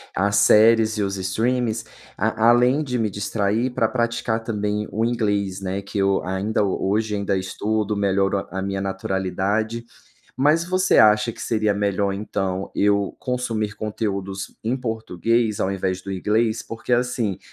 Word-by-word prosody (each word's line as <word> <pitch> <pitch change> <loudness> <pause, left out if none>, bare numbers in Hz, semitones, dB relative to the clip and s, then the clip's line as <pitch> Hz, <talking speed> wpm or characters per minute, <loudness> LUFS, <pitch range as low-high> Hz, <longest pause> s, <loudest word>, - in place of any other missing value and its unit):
as 100 +2 +1
séries 110 +1 +5
e 105 - +1
os 95 0 -2
streamings 110 +5 -1 0.3
a 110 +1 +1
além 125 +5 +4
de 125 -3 -2
me 110 -2 0
distrair 105 +4 -1
pra 115 -3 +1
praticar 115 -1 -1
também 105 -2 -2
o 110 - -1
inglês, 100 -5 0
né, 95 +1 -3
que 100 - -6
eu 100 0 +2
ainda 95 +4 0
hoje 105 +2 0
ainda 100 -1 0
estudo, 105 +2 -2
melhoro 100 0 +1
a 95 0 -4
minha 100 0 -2
naturalidade. 95 +4 -2 0.5
Mas 150 +5 +3
você 185 +1 +2
acha 105 +1 +5
que - - -15
seria 110 -2 0
melhor, 100 -1 0
então, 95 -1 -3
eu 100 0 +1
consumir 115 -5 -2
conteúdos 100 -3 -4
em 115 +4 0
português 115 -2 -1
ao 95 - 0
invés 95 -1 -2
do 100 +1 -7
inglês? 110 +4 0
Porque 115 +2 -7
assim, 120 -5 +1
105 Hz, 150 wpm, -22 LUFS, 100-115 Hz, 0.5 s, séries